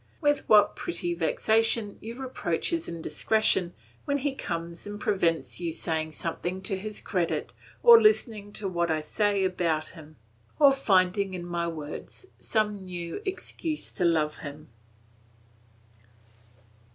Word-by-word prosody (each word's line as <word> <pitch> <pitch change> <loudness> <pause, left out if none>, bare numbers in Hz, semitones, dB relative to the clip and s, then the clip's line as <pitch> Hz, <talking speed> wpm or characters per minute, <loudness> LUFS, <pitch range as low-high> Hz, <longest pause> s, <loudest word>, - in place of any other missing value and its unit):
With 290 -2 +1
what 210 -1 +6
pretty 345 0 -2
vexation 225 - +1
you 230 +2 -7
reproach 250 -10 -1
his 335 -1 -2
indiscretion 175 +3 0 0.3
when 285 - +1
he 285 0 -1
comes 170 -6 -5
and 205 0 -6
prevents 170 -6 0
you 170 -2 -2
saying 160 -1 -2
something 175 +4 -3
to 195 - +1
his 210 +2 -5
credit, 180 -5 -2 0.3
or 470 -1 +10
listening 225 - +2
to 205 - -3
what 170 -2 0
I 155 -1 +1
say 200 +5 +1
about 170 -4 0
him, 155 -2 -14 0.4
or 285 -2 +7
finding 195 -6 +2
in 175 -1 -6
my 170 -1 -2
words 155 - -7
some 210 -3 -1
new 175 - -5
excuse 360 -4 -4
to 180 - -3
love 160 -3 +1
him! 145 +1 -9
190 Hz, 135 wpm, -27 LUFS, 170-225 Hz, 0.4 s, or